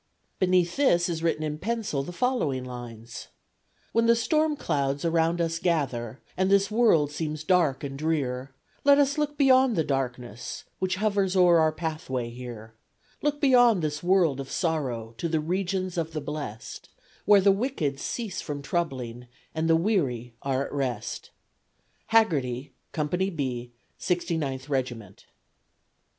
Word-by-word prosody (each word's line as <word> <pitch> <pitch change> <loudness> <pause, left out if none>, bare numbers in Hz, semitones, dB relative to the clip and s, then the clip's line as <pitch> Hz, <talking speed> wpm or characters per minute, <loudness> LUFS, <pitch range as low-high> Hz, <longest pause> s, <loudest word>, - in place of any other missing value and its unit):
Beneath 180 -2 +2
this 180 -11 +3
is 165 -2 -3
written 165 -2 0
in 150 0 -3
pencil 215 -7 -2
the 140 - -6
following 175 - 0
lines: 120 -2 -8 0.6
When 230 0 +2
the 235 - +6
storm 305 +6 +1
clouds 140 - -1
around 165 +1 +2
us 165 -1 0
gather, 130 -9 -1 0.2
And 190 +1 +1
this 200 +1 +3
world 210 -11 +4
seems 155 0 -4
dark 160 -7 +2
and 135 -1 -5
drear, 135 -4 -1 0.3
Let 280 0 +6
us 285 +1 +2
look 295 -1 -1
beyond 260 -3 +5
the 160 - +2
darkness 125 -5 -4 0.2
Which 185 0 0
hovers 200 -1 +1
o'er 175 -2 +6
our 160 0 +4
pathway 155 -7 -4
here; 120 -3 -9 0.5
Look 295 0 0
beyond 245 - +5
this 150 -1 -2
world 175 -6 +3
of 135 -1 -6
sorrow 130 -10 -2
To 170 - -1
the 160 -1 +1
regions 185 +2 -1
of 165 -1 -3
the 155 - -2
blest, 145 -7 -6 0.4
Where 205 -1 +7
the 195 +1 +5
wicked 195 - -1
cease 210 +3 -4
from 145 -2 -5
troubling 130 -7 -3 0.3
And 160 0 -1
the 165 - +6
weary 140 - 0
are 135 0 0
at - - -9
rest. 135 -4 -3 0.8
Haggerty, 140 - +1 0.2
Co. 155 - -1
B, 145 -8 -2 0.3
69th 155 -7 -2
Reg't. 120 -8 -4
160 Hz, 145 wpm, -27 LUFS, 135-190 Hz, 0.8 s, Where